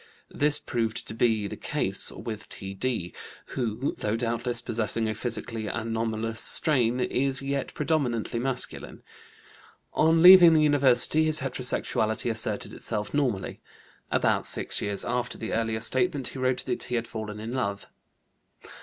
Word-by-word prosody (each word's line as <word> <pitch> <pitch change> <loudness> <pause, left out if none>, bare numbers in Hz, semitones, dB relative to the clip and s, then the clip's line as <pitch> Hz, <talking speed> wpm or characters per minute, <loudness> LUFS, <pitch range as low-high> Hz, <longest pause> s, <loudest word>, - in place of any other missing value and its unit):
This 150 0 +2
proved 115 -1 -3
to - - -5
be! 110 -2 +1
the - - -7
case - - 0
with 110 -1 -8
T.D., 95 -1 -4 0.4
who, 120 +1 -2
though 105 +1 -1
doubtless 120 +1 -1
possessing 115 -1 -2
a 110 - -1
psychically 115 -2 -3
anomalous 115 0 -3
strain, 125 -6 +3
is 135 +2 0
yet 140 -1 -3
predominantly 130 -7 -1
masculine. 130 0 -2 0.9
On 160 +1 +3
leaving 180 -2 +10
the 155 -1 +4
university 145 +1 +3
his 155 -1 +5
heterosexuality 120 -3 -2
asserted 110 -2 -1
itself 105 -2 -4
normally. 125 -10 -2 0.5
About - - +1
six - - +1
years 100 -1 -1
after 125 0 -2
the 110 - -5
earlier 110 0 -1
statement, 125 +3 +1
he 135 - -8
wrote 130 -1 0
that - - -3
he 125 - -3
had 115 -1 -2
fallen 110 -2 -6
in 110 +2 -6
love. 100 -6 -3
120 Hz, 140 wpm, -26 LUFS, 110-135 Hz, 0.9 s, leaving